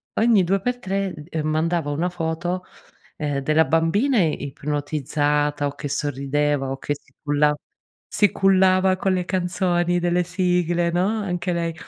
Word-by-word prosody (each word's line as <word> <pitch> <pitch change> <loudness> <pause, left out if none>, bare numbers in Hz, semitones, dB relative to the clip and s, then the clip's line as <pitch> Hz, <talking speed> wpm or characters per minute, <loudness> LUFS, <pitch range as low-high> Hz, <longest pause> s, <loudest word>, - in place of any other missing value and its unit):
ogni 220 -4 +4
due 195 +2 +1
per 245 +3 -1
tre, 195 -2 -2 0.2
ehm, 160 -3 -3
mandava 160 0 0
una 160 +5 0
foto, 175 +1 -3 0.5
ehm, 145 -2 -2
della 155 +3 +3
bambina 200 - +2
ipnotizzata 145 -1 -1
o 140 - -6
che 145 - -5
sorrideva 140 0 -1
o 135 - -3
che 145 +2 -3
si 135 -1 -21
culla 150 0 +2 0.5
si 205 - +2
cullava 190 -1 +3
con 190 0 0
le 180 -1 -1
canzoni 175 -1 0
delle 175 0 +1
sigle, 175 -1 0
no, 175 +2 +1
anche 180 -3 -2
lei, 170 -1 -1
170 Hz, 145 wpm, -22 LUFS, 150-185 Hz, 0.5 s, ogni